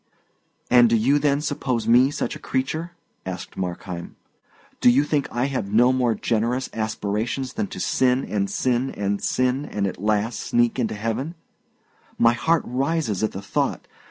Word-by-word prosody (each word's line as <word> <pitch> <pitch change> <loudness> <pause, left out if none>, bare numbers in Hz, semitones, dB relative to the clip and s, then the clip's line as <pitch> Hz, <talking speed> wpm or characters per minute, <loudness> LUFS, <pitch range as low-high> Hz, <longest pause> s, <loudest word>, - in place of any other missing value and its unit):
"And 120 -1 +7
do 115 - +3
you, 135 +7 +3
then, 145 0 +1
suppose 130 -6 -2
me 125 +3 +6
such 145 - -3
a - - -9
creature?" 160 +6 -2 0.3
asked 95 -1 -7
Markheim. 90 -1 -5 0.6
"Do - - +6
you 130 +4 +4
think 150 -1 0
I 120 +2 0
have 125 -8 -3
no 120 +4 +5
more 125 -3 +1
generous 120 +4 -1
aspirations 110 +4 -2
than 210 0 -2
to - - -8
sin 130 0 +2
and 100 -2 -1
sin 125 +1 0
and 100 0 -2
sin 130 +2 +1
and 105 -8 -2
at 95 -1 -4
last 110 +2 0
sneak 120 +1 +1
into 115 -3 -1
heaven? 115 +10 -3 0.8
My 115 0 +5
heart 160 +7 +1
rises 135 - -1
at 110 - +1
the 95 - -6
thought. - - -1
120 Hz, 165 wpm, -23 LUFS, 110-135 Hz, 0.8 s, And